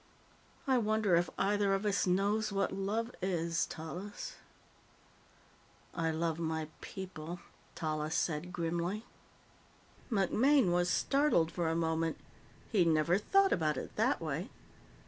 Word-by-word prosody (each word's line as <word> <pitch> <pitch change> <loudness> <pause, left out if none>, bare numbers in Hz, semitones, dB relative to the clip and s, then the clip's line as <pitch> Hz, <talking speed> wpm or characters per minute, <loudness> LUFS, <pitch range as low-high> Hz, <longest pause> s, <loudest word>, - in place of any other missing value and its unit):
"I 260 -3 +3
wonder 215 -4 +2
if 175 +1 +2
either 200 -1 +2
of 195 +2 -3
us 200 -2 +1
knows 205 +4 +1
what 195 0 0
love 215 +5 -2
is, 170 -3 0
Tallis?" 180 +6 -7 1.6
"I 165 -1 0
love 160 0 -1
my 160 -1 -2
people," 175 -3 -7 0.4
Tallis 155 0 -2
said 165 +2 -1
grimly. 175 +5 -2 1.1
MacMaine 225 +3 +3
was 175 0 +2
startled 275 - +2
for 170 -2 -1
a 165 - 0
moment. 165 0 0 0.5
He'd 185 -6 +4
never 160 +3 +3
thought 390 - +4
about 155 -4 +1
it - - -6
that - - +2
way. - - -3
180 Hz, 125 wpm, -33 LUFS, 165-205 Hz, 1.6 s, He'd